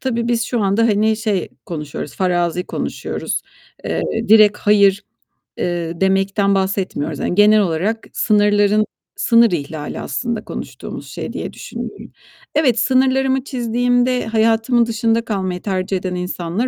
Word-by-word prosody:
Tabii 235 -2 -1
biz 235 -1 +1
şu 240 -1 -1
anda, 200 +3 +2
hani, 220 -1 +2
şey 215 -4 -1 0.2
konuşuyoruz, 150 -3 -6
farazi 180 -1 0
konuşuyoruz. - - -4 0.4
Eee, - - -1 0.3
direkt 215 -1 +6
hayır, 200 -1 +4 0.6
eee, 170 -1 -3
demekten 195 +1 +2
bahsetmiyoruz. 190 -6 -2
Yani - - -1
genel 210 +1 +6
olarak 195 +5 -1
sınırların 205 0 +3 0.3
sınır 230 -1 +4
ihlali 150 -2 -4
aslında 235 -3 -3
konuştuğumuz - - -7
şey - - -6
diye - - -5
düşünüyorum. - - -8 0.4
Evet, 260 -7 +3
sınırlarımı 265 +1 +2
çizdiğimde 245 0 0
hayatımın 225 +2 +2
dışında 230 0 0
kalmayı 185 -4 -2
tercih 190 -1 -1
eden 185 0 -4
insanlar 180 +4 -2
210 Hz, 125 wpm, -19 LUFS, 185-230 Hz, 0.6 s, direkt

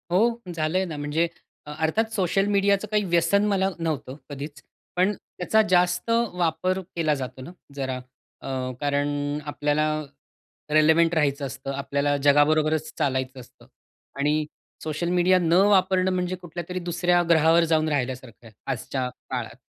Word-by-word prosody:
हो 180 - +4 0.4
झालंय 165 +4 0
ना, 160 -4 -6
म्हणजे 145 +3 0 0.4
अ 150 - -8
अर्थात 220 +8 +1
सोशल 195 0 +1
मीडियाचं 200 +1 +2
काही 210 -1 +2
व्यसन 175 +3 +2
मला 195 -2 +2
नव्हतं 150 -5 -3
कधीच. 145 +1 -7 0.3
पण 185 +3 +3
त्याचा 205 +2 0
जास्त 180 +2 +2 0.3
वापर 180 +2 0 0.2
केला 160 -3 +1
जातो 130 -1 -6
ना, 130 - -9 0.2
जरा 130 -2 -2 0.5
अ, 130 -1 -3
कारण 145 0 0 0.4
आपल्याला 145 +1 0 0.9
रिलेव्हंट 160 +2 +5
राहायचं 140 -2 +1
असतं, 135 +1 -6
आपल्याला 140 +1 0
जगाबरोबरच 155 +2 +3
चालायचं 130 -1 -1
असतं 125 - -16 0.5
आणि 150 +2 +1 0.4
सोशल 155 +2 -2
मीडिया 180 +1 +4
न 165 -2 +1 0.2
वापरणं 190 -1 +3
म्हणजे 180 0 -1
कुठल्यातरी 175 0 -6
दुसऱ्या 175 0 +1
ग्रहावर 165 +1 +5
जाऊन 155 0 +3
राहिल्यासारखं 130 -4 -4
आहे, 110 - -16 0.2
आजच्या 130 0 -3 0.2
काळात. 120 -3 -4
160 Hz, 135 wpm, -25 LUFS, 140-180 Hz, 0.9 s, रिलेव्हंट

